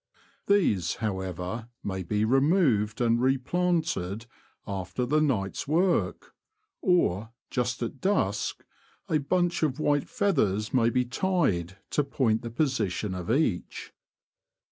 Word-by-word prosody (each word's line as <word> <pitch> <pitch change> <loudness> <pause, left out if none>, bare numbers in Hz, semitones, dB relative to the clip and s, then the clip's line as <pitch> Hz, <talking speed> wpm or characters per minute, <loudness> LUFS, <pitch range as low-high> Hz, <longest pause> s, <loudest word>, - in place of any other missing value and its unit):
These, 105 - +2
however, 95 +2 -4
may 95 -1 -3
be 105 +4 0
removed 135 - +2
and 120 0 +3
re 135 +1 +3
planted 155 - -1 0.4
after 95 +4 -3
the 150 +5 +2
night's 115 -7 -1
work; 175 +5 +1 0.5
or, 110 - +2 0.2
just 125 -1 -1
at 125 +3 -5
dusk 105 - 0 0.4
a 155 - +2
bunch 175 +4 0
of 150 -3 0
white 145 -2 +1
feathers 110 - +1
may 115 -3 +4
be 125 +1 +1
tied 120 - 0
to 150 - +2
point 125 -5 +1
the 120 - -5
position 115 - -1
of 90 0 -5
each. 115 - -1
120 Hz, 120 wpm, -27 LUFS, 100-155 Hz, 0.5 s, may